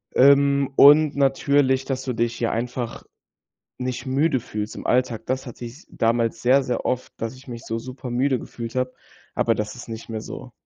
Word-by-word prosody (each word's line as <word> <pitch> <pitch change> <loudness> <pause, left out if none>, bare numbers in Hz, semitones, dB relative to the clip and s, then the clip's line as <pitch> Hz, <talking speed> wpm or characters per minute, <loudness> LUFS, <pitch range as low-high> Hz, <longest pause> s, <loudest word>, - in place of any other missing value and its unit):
Ähm, 140 0 +5
und 150 +1 +7
natürlich, 135 -1 +2
dass 130 -1 -3
du 130 -2 -2
dich, 115 +1 -1
ja, 115 - 0
einfach 120 +1 -4 0.7
nicht 125 +1 -4
müde 135 +1 +1
fühlst 105 -1 -5
im - - -8
Alltag, 125 -3 +1
das 130 +2 -2
hatte 120 0 -8
ich 125 +8 -11
damals 115 0 0
sehr, 130 +3 +4
sehr 125 - -3
oft, 125 0 -2
dass 115 +3 -4
ich 130 +2 -16
mich 120 -2 -8
so 115 - -3
super 130 +1 -8
müde 130 +1 +1
gefühlt 115 0 -8
habe, 130 0 -1 0.4
aber 115 -1 +1
das 105 +2 -4
ist 120 - -10
nicht 115 0 -8
mehr 110 -1 -4
so. 125 +2 -9
125 Hz, 190 wpm, -23 LUFS, 115-135 Hz, 0.7 s, und